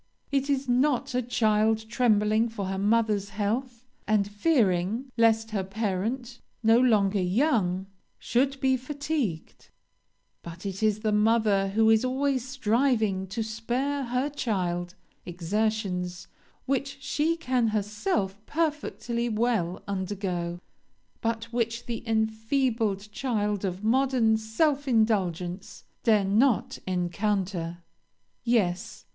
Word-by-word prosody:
It 275 0 0
is 275 -1 0
not 250 +1 +1
a 250 - +1
child 220 -2 +1
trembling 220 -1 +2
for 210 -3 -4
her 190 0 -3
mother's 210 -1 +1
health, 230 +4 -3 0.2
and 210 -2 +2
fearing, 210 - +1
lest 225 -1 +3
her 200 -3 -1
parent, 220 +5 -3 0.2
no 225 +1 +6
longer 210 -5 +3
young, 190 - +1 0.3
should 270 +3 0
be 265 -1 +2
fatigued; 280 - -4 0.7
but 170 +3 -10
it 195 0 -4
is 215 -1 +2
the 215 - +1
mother 210 -2 +3
who 220 +3 +3
is 220 +1 +4
always 260 0 0
striving 230 -6 +1
to 220 +4 -3
spare 245 +6 -2
her 250 +3 0
child 180 -10 -2 0.3
exertions 180 0 -2 0.4
which 275 +1 -1
she 310 +4 0
can 255 -7 +1
herself 210 - -1
perfectly 295 -7 -1
well 215 -6 0
undergo, 185 -3 -3 0.6
but 230 -1 -1
which 230 0 -1
the 235 -2 -4
enfeebled 220 -1 0
child 210 -5 -1
of 190 +1 -3
modern 245 -1 +3
self 275 +7 0
indulgence 195 -6 0 0.2
dare 215 -3 +3
not 220 +5 +2
encounter. 180 -2 -1 0.6
"Yes! 200 -7 0
220 Hz, 115 wpm, -27 LUFS, 195-250 Hz, 0.7 s, no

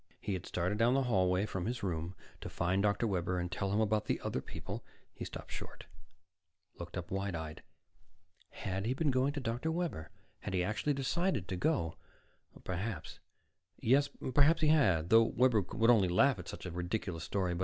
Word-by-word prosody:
He 100 - -3
had 90 - -4
started 90 +4 -1
down 120 +3 +4
the 135 - +3
hallway 95 -5 +2
from 95 -3 -3
his 120 -1 -3
room, 85 -1 -2 0.2
to - - -6
find 90 +3 0
Dr. 105 +3 +2
Webber 90 -3 0
and 90 0 -2
tell 95 +1 -2
him 105 - +2
about 110 -1 +1
the - - 0
other - - -2
people - - -7 0.3
He - - -6
stopped - - -8
short, - - -7 0.9
looked 85 +1 -6
up 90 -1 -6
wide 95 -1 -2
eyed. 80 -1 -6 0.9
Had 95 +2 -3
he 125 - 0
been 150 0 +1
going 130 +2 +2
to 145 - -3
Dr. 125 +5 -2
Webber? 165 - -3 0.3
Had 100 - -4
he 90 - +2
actually 110 +9 0
decided 140 - 0
to 95 - -1
go? 110 - 0 0.7
Perhaps 95 -1 -4 0.6
yes, 140 +5 +3 0.2
perhaps 155 +5 +5
he 155 - +5
had, 95 - +3
though 115 +1 +8
Webber 115 -1 +3
would 115 +5 +3
only 100 -6 +4
laugh 120 +6 +4
at 90 - -8
such - - -7
a 90 - -4
ridiculous 90 -1 -3
story. 90 -2 -1
100 Hz, 185 wpm, -33 LUFS, 90-125 Hz, 0.9 s, though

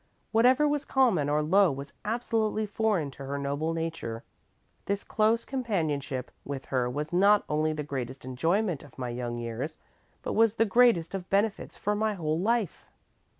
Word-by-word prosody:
Whatever 255 +6 +5
was 290 -1 0
common 225 - +2
or 150 +1 +2
low 190 +4 +4
was 140 +1 -7
absolutely 220 -1 0
foreign 205 -8 0
to 140 - -10
her 140 +1 -3
noble 140 +3 -1
nature. 165 -9 -4 0.6
This 200 0 -1
close 220 +2 +1
companionship 155 - -2
with 135 -1 -5
her 125 -2 0
was 150 +5 -4
not 200 +3 +5
only 155 +1 +1
the 155 -1 -3
greatest 130 -2 -5
enjoyment 165 - 0
of 145 - -16
my 125 -2 -3
young 120 0 -4
years, 120 +6 -4 0.5
but - - -2
was 225 -1 +4
the 225 - +3
greatest 220 -6 +4
of 190 -2 -5
benefits 205 +2 0
for 210 - 0
my 215 0 0
whole 160 -3 -1
life." 220 -2 0
165 Hz, 165 wpm, -28 LUFS, 140-215 Hz, 0.6 s, Whatever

